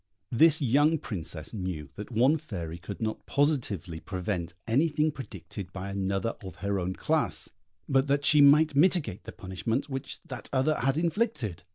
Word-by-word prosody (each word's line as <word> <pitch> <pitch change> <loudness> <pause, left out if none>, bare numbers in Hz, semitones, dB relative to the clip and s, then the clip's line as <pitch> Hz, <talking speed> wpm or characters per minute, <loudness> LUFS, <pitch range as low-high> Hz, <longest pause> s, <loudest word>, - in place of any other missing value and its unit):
This 155 +5 +5
young 145 +6 +4
Princess 85 - -4
knew 90 -8 -4
that 105 - -8
one 130 +7 +3
fairy 85 - -6
could 100 +4 -8
not 110 0 -3
positively 120 - 0
prevent 90 -2 -4
anything 150 +5 +2
predicted 100 - -8
by 95 +1 -5
another 100 +3 -1
of 95 -4 -8
her 100 +2 -1
own 90 +1 -2
class, - - 0 0.4
but 135 +1 +2
that 140 0 +1
she 150 +1 +6
might 150 +1 +6
mitigate 150 - +3
the - - -6
punishment 110 +9 -3
which 135 +1 -5
that 130 -4 -8
other 140 +3 +2
had 135 +3 +1
inflicted. 165 - -1
115 Hz, 160 wpm, -28 LUFS, 95-145 Hz, 0.4 s, she